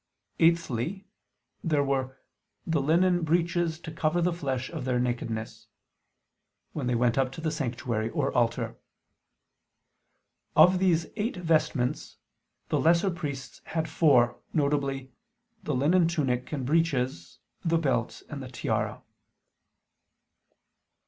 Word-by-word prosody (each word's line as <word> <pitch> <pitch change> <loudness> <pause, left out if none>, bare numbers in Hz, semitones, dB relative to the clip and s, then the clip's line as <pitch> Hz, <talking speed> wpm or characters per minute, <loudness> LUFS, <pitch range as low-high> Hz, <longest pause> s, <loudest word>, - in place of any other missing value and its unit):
Eighthly, 165 - +1 0.6
there 150 -4 +2
were 130 -1 -1 0.5
"the 160 -3 +1
linen 175 +5 +3
breeches 170 0 +1
to 160 - -7
cover 160 +1 0
the 175 0 +1
flesh 135 -6 -2
of - - -5
their 125 -1 0
nakedness," 115 -2 -3 1.1
when 140 -5 -3
they 125 - +1
went 120 +1 +2
up 130 -1 +1
to - - -8
the 160 -1 -1
sanctuary 120 -6 -2
or - - -1
altar. - - 0 1.8
Of 180 +4 +7
these 170 -3 +2
eight 215 -1 -1
vestments 155 -5 0 0.5
the - - +1
lesser 170 +4 +3
priests 145 -6 -6
had 160 -1 -2
four, 145 -6 +3 0.2
viz. 140 -3 0 0.6
the 150 - -2
linen 165 +6 +3
tunic 135 -7 -1
and 140 -4 -3
breeches, 130 - 0 0.3
the 165 -1 +2
belt 130 -7 -1
and 145 -3 -6
the 130 - -7
tiara. 125 - -2
150 Hz, 120 wpm, -28 LUFS, 125-165 Hz, 1.8 s, Of